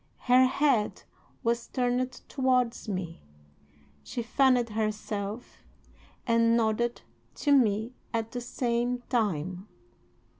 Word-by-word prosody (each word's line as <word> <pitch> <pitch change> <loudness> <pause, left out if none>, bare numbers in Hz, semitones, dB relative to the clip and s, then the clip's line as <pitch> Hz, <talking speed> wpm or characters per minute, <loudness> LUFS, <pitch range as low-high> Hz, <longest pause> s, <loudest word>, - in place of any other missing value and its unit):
Her 255 +1 +6
head 265 -5 +1 0.4
was 235 0 0
turned 250 0 0 0.2
towards 255 -4 0
me. 185 -4 -4 0.8
She 240 - -4
fanned 250 -1 +3
herself 215 0 -3 0.7
and 230 0 +3
nodded 235 +1 0 0.3
to 290 - 0
me 230 -3 +3 0.2
at 225 -1 -2
the 245 - -4
same 245 0 -1
time. 185 - -1
235 Hz, 100 wpm, -28 LUFS, 215-250 Hz, 0.8 s, Her